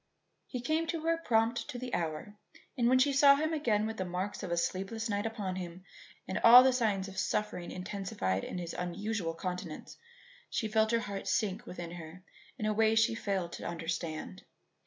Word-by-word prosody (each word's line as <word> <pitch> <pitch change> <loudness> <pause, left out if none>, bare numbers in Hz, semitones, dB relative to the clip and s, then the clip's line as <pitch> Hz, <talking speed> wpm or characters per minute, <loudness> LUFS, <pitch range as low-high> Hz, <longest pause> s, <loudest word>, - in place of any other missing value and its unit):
He 250 - -4
came 315 +6 0 0.4
prompt 225 +1 +2
to 255 - -5
the 250 0 -6
hour, 165 +4 -2 0.4
and 240 -1 +2
when 255 - +5
she 275 +2 +3
saw 280 +1 +7
him 315 +3 -1
again 220 -9 +1
with 220 0 -4
the 185 - -1
marks 180 +3 -3
of 190 - -5
a 170 - 0
sleepless 195 +6 -2
night 205 +1 0
upon 205 -5 -4
him 180 0 -7 0.4
and 190 - -2
all 245 +2 +10
the 260 0 +4
signs 210 -6 0
of 190 -1 -6
suffering 210 -5 -1
intensified 180 - -3
in - - -5
his 170 -2 -5
unusual 180 -1 -3
countenance, 180 -2 -6 0.5
she 220 - -1
felt 220 0 +2
her 230 0 +2
heart 200 -2 -5
sink 215 +3 0
within 175 -2 -6
her 170 +1 -9 0.3
in 215 - -3
a 215 - +2
way 220 +1 +3
she 225 +1 +4
failed 195 -6 -2
to - - -6
understand. 165 - -4
205 Hz, 185 wpm, -32 LUFS, 180-230 Hz, 0.5 s, all